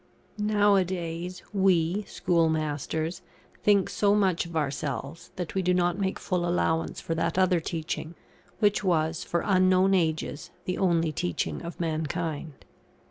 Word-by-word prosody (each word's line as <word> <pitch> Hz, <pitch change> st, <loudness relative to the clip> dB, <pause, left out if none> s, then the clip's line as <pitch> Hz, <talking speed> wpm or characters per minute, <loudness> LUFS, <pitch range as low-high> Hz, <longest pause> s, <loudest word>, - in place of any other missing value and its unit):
Nowadays, 185 Hz, -4 st, +1 dB
we, 190 Hz, 0 st, +2 dB
schoolmasters, 160 Hz, 0 st, 0 dB, 0.4 s
think 200 Hz, -2 st, +4 dB
so 205 Hz, 0 st, +2 dB
much 185 Hz, -4 st, +2 dB
of 170 Hz, -, -10 dB
ourselves, 145 Hz, +1 st, -3 dB
that 180 Hz, -3 st, -4 dB
we 190 Hz, -, +1 dB
do 180 Hz, 0 st, +2 dB
not 175 Hz, +1 st, +1 dB
make 190 Hz, -1 st, -1 dB
full 180 Hz, -2 st, -1 dB
allowance 170 Hz, -2 st, 0 dB
for 165 Hz, -, -3 dB
that 165 Hz, +1 st, -1 dB
other 185 Hz, -2 st, +4 dB
teaching, 160 Hz, 0 st, -4 dB, 0.4 s
which 205 Hz, -1 st, +2 dB
was, 160 Hz, -3 st, +1 dB
for 170 Hz, -, -1 dB
unknown 185 Hz, -1 st, +4 dB
ages, 160 Hz, -4 st, 0 dB, 0.2 s
the 180 Hz, -, -2 dB
only 170 Hz, -4 st, +2 dB
teaching 85 Hz, -, -2 dB
of 170 Hz, -, -7 dB
mankind. 160 Hz, -2 st, -3 dB
175 Hz, 135 wpm, -27 LUFS, 160-185 Hz, 0.4 s, think